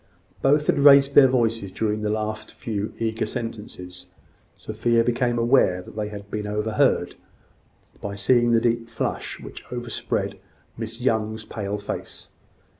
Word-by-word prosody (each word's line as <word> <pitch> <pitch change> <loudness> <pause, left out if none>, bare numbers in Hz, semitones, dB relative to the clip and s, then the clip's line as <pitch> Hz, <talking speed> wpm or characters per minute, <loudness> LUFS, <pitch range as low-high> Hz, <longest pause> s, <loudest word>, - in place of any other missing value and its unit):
Both 145 +2 +3
had - - +2
raised 140 -1 +7
their 135 -1 +8
voices 115 -6 0
during 105 0 -1
the 105 - -1
last 110 0 -3
few 105 -2 -3
eager 110 -1 -1
sentences. 105 -7 -7 0.5
Sophia 115 +2 +1
became 120 0 0
aware 115 -7 +3
that - - -13
they 105 -1 -2
had 100 -1 -9
been 105 -1 -3
overheard, 105 +1 +1 0.9
by 100 0 -4
seeing 120 +4 +3
the 115 -1 +4
deep 115 0 0
flush 115 - -3
which - - -10
overspread 120 -2 -3 0.4
Miss 115 +1 -6
Young's 110 -3 0
pale 105 -2 -4
face. 100 - -6
110 Hz, 140 wpm, -24 LUFS, 105-120 Hz, 0.9 s, their